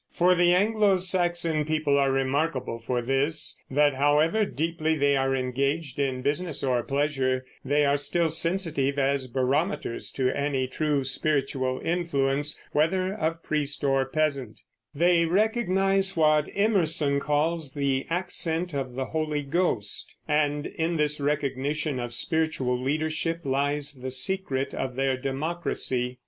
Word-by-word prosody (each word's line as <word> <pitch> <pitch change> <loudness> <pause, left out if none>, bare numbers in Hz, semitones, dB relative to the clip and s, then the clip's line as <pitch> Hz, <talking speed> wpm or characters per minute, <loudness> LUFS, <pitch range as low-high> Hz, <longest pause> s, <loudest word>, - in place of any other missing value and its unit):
For 180 +1 +3
the 175 0 +4
Anglo 205 0 +3
Saxon 175 -4 0
people 155 -1 0
are 140 -1 +3
remarkable 135 -2 -1
for 120 +1 -2
this, 135 +5 0
that 145 +1 +3
however 150 +9 +3
deeply 160 -1 -1
they 140 -1 +2
are 135 0 +1
engaged 140 +3 -2
in 130 -2 -1
business 150 +2 -2
or 125 -3 +1
pleasure, 135 -1 -1 0.2
they 145 +2 +2
are 140 0 +3
still 160 +4 0
sensitive 160 -4 0
as 135 -1 +1
barometers 135 +3 -1
to 130 -1 +1
any 140 -2 -1
true 145 +1 -1
spiritual 135 -1 0
influence, 145 -4 0
whether 185 +5 +1
of 165 -4 -2
priest 150 -1 0
or 135 -1 +2
peasant; 140 -6 -2 0.3
they 170 +2 +3
recognize 195 -1 +1
what 155 -1 +3
Emerson 165 -9 +2
calls 150 0 -1
the 140 -2 -1
"accent 175 -1 -1
of 135 -3 -3
the 130 0 -2
Holy 155 0 -2
Ghost," 140 - -1
and 150 -1 +1
in 165 +1 -2
this 150 -1 +1
recognition 145 0 -1
of 120 -1 -4
spiritual 155 -2 +1
leadership 155 +4 -1
lies 145 +1 -1
the 130 -1 -6
secret 135 0 -2
of 130 -2 -3
their 135 0 +1
democracy. 135 -3 -2
145 Hz, 135 wpm, -26 LUFS, 135-165 Hz, 0.3 s, the